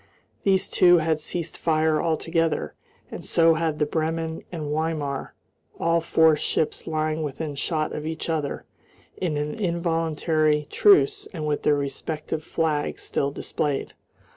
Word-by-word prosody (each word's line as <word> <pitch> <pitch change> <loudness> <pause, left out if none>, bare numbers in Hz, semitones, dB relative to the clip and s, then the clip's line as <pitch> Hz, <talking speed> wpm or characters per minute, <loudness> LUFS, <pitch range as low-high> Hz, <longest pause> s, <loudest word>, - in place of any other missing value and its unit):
These 190 -1 +2
two 175 -1 +5
had 160 -1 +1
ceased 170 +1 -4
fire 155 -1 +2
altogether, 165 0 0 0.4
and - - -7
so 165 -1 +4
had 160 -1 -1
the 150 - +2
Bremen 160 +1 -2
and 165 -3 -5
Weimar, 150 -3 -2 0.4
all 170 0 +2
four 160 -1 +4
ships 150 +1 -1
lying 155 0 -1
within 150 +1 -4
shot 155 +2 -1
of 150 +1 -4
each 160 0 -4
other 155 -4 -2 0.5
in 165 -5 -1
an 150 +1 -2
involuntary 165 -5 0
truce 410 0 +4
and 155 -2 -3
with 150 -1 0
their 150 - +3
respective 150 +2 -4
flags 155 -2 -1
still 140 - -1
displayed. 140 0 -3
160 Hz, 140 wpm, -25 LUFS, 150-165 Hz, 0.5 s, two